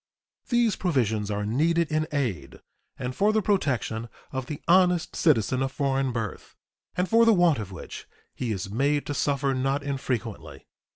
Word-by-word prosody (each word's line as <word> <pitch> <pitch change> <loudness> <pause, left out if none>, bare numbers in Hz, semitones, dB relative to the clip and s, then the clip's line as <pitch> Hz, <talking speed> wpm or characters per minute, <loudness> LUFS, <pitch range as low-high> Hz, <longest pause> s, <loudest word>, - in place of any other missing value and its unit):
These 240 -4 +2
provisions 110 - 0
are 105 0 -2
needed 160 +9 +1
in 155 0 +1
aid 115 - -3 0.4
and 125 0 -4
for 210 +2 +3
the 220 - +2
protection 125 - 0 0.2
of 130 -2 -4
the 150 - -5
honest 180 -1 +3
citizen 130 - +2
of 135 0 -1
foreign 135 -2 0
birth, 115 -3 -5 0.4
and 180 +1 +1
for 230 +2 +5
the 230 -1 +6
want 175 -7 +4
of 100 -2 -6
which 90 - -9 0.3
he 125 -3 -3
is 95 -1 -4
made 140 +6 +1
to 145 - -3
suffer 140 -1 0
not 135 +2 0
infrequently. 130 -5 -4
135 Hz, 165 wpm, -26 LUFS, 115-165 Hz, 0.4 s, the